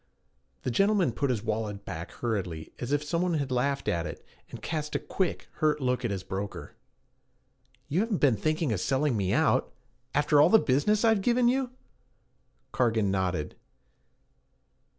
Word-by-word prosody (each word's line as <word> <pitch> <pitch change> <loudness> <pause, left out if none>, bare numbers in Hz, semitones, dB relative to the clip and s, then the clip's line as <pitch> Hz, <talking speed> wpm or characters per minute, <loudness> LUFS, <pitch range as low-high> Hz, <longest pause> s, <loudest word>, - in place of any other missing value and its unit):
The 125 - -1
gentleman 195 - +3
put 140 +4 -1
his 115 -4 -1
wallet 105 -2 -3
back 85 -2 -6
hurriedly 95 -9 -4
as 125 +2 -4
if 145 0 +1
some 165 +3 -1
one 180 -2 +1
had 140 -4 -2
laughed 140 +3 0
at 85 -1 0
it, - - -9 0.2
and - - -8
cast 150 -2 -4
a - - +2
quick, 190 -3 -2
hurt 150 -1 +2
look 125 -2 0
at 120 - 0
his 95 -2 -3
broker. 100 +1 -6 1.1
'You 160 - 0
haven't 220 -1 +1
been 135 -7 +4
thinking 155 +4 0
of 95 - -2
selling 135 +4 +1
me 95 -3 0
out - - +2 0.4
after 145 0 +4
all - - +6
the 220 - +7
business 210 - +2
I've 220 -3 +4
given 240 +3 +3
you?' 260 +1 +1 1.0
Cargan 110 -5 +1
nodded. 90 -5 -1
135 Hz, 165 wpm, -28 LUFS, 105-165 Hz, 1.1 s, the